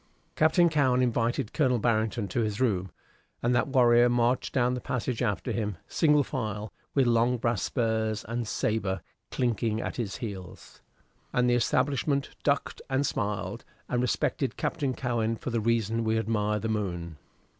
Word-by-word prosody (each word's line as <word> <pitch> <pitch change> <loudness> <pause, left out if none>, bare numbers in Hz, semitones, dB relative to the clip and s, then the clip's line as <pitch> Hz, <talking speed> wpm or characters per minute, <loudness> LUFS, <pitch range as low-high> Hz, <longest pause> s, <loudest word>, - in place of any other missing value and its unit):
Captain 160 +3 +4
Cowen 140 -6 +2
invited 120 0 0
Colonel 130 -5 +2
Barrington 110 -1 0
to 95 - -1
his 105 -2 -2
room, 95 -7 +1 0.5
and 120 +1 +2
that 120 0 +2
warrior 120 -3 +5
marched 120 +1 +1
down 125 -2 +2
the 125 - -3
passage 125 -1 -2
after 105 -5 -1
him, 105 -5 -2
single 150 -2 +3
file, 110 -7 -4 0.2
with 135 -2 +4
long 120 +1 +3
brass 115 -3 0
spurs 110 -3 -1
and 115 0 -3
sabre 100 -4 -1 0.3
clinking 115 -3 0
at - - -4
his 105 -7 -3
heels; 95 -6 -8 0.5
and 125 0 +2
the 120 - +3
establishment 135 +3 +1
ducked 140 -1 0
and 135 +2 +1
smiled, 100 -2 -2 0.2
and 125 -1 0
respected 125 +2 0
Captain 140 -6 -1
Cowen 115 -3 -1
for 125 - -5
the 115 -1 0
reason 115 0 +1
we 110 0 +1
admire 105 -2 0
the 110 - -3
moon. 85 -7 -3
115 Hz, 155 wpm, -28 LUFS, 110-125 Hz, 0.5 s, warrior